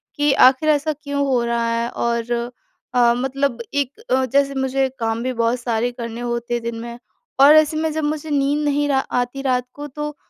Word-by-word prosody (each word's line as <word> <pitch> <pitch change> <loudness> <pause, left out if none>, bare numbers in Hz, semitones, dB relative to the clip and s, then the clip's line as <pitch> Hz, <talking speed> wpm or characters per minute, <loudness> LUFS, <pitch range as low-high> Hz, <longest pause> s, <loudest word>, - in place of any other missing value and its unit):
कि 290 -1 +2 0.2
आख़िर 270 +4 -2
ऐसा 305 +1 +2
क्यों 285 -1 -1
हो 250 -3 +1
रहा 235 0 0
है 235 0 -2
और 235 0 -2 0.6
अ, 240 -1 +4
मतलब 265 -1 -1
एक 285 - -2
अ, 260 0 +2
जैसे 275 +2 +1
मुझे 265 0 0
काम 225 0 -1
भी 255 0 -2
बहुत 235 +1 0
सारे 240 0 -1
करने 235 -1 -7
होते 240 0 -3
हैं 240 -1 -2
दिन 235 0 -4
में। 235 0 -7 0.4
और 285 +3 +8
ऐसे 310 0 +4
में 320 0 0
जब 315 0 -2
मुझे 305 +1 -3
नींद 290 +1 +1
नहीं 290 0 +1
रा 270 -1 +3 0.2
आती 245 +2 -3
रात 250 -1 0
को 290 0 -7
तो 295 +1 -6
265 Hz, 205 wpm, -20 LUFS, 235-290 Hz, 0.6 s, और